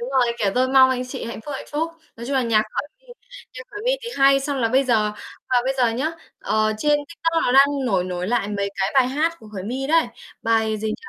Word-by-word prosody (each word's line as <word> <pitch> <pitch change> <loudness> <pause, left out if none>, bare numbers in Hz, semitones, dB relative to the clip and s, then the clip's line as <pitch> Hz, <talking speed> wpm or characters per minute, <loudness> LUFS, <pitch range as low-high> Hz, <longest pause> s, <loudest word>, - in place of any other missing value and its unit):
đúng 245 +2 -5
rồi, 250 -3 +2
kiểu, 200 -2 +1
tôi 255 +1 +2
mong 260 0 +6
anh 250 0 -2
chị 255 -1 -6
hạnh 230 - -6
phúc, 290 - -4
hạnh - - -8
phúc. 320 +3 -1 0.3
Nói 235 +1 -8
chung 275 - -2
là 260 - +2
nhạc 220 -2 +3
Khởi 290 - -3
My - - -30 0.5
nhạc - - -7
Khởi 415 0 -7
My - - +3
thì 470 - -5
hay, 275 0 +5
xong 280 0 -3
là 230 - +1
bây 265 +3 +3
giờ 215 -4 +1 0.4
và 255 - +3
bây 270 - 0
giờ 240 -2 +3
nhá, 280 +8 -2 0.3
ờ, 215 0 +1
trên 295 +3 +2
TikTok 330 -1 -1
nó 250 - +2
đang 275 +1 +7 0.2
nổi 190 -6 +1
nổi 180 +1 -4
lại 220 -4 0
mấy 200 -1 -2
cái 190 - +1
bài 255 -2 +4
hát 320 +5 0
của 215 - -14
Khởi 195 -3 -7
My 260 +5 -3
đấy, 325 -3 +4 0.4
bài 220 -1 +1
gì 220 +1 -3
nhỉ? 215 - -2
255 Hz, 265 wpm, -22 LUFS, 220-275 Hz, 0.5 s, đang